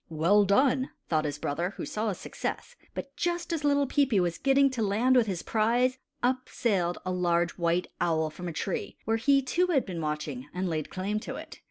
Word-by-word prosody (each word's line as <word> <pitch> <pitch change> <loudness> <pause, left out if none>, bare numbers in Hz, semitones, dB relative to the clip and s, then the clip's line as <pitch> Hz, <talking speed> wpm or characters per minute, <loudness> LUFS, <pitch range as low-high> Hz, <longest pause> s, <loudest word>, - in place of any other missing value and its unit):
"Well 170 +6 +4
done!" 260 +6 +3 0.2
thought 155 -2 +1
his 145 -1 -2
brother, 170 +7 -2
who - - -4
saw 215 +1 -2
his 195 - -3
success; 485 - -5 0.2
but 275 0 -6
just 345 0 -1
as 315 -2 -2
little 285 -1 +3
Peepi 270 -6 +2
was 175 -2 0
getting 275 0 +4
to 250 -3 -3
land 220 +5 +3
with 240 -3 +4
his 185 -4 -3
prize, 240 +4 +2 0.2
up 255 +1 0
sailed 180 -7 0
a 185 - -1
large 175 -1 +1
white 170 0 0 0.2
owl 160 -2 +1
from 175 +3 -7
a - - -3
tree 175 +4 -3
where 225 +1 +2
he, 275 +4 +3
too, 345 +8 +1
had 300 -7 +2
been 175 -4 -5
watching, 150 -3 -4
and 185 +1 -1
laid 155 -3 -2
claim 200 +3 -2
to - - -6
it. - - -9
200 Hz, 210 wpm, -28 LUFS, 170-260 Hz, 0.2 s, Well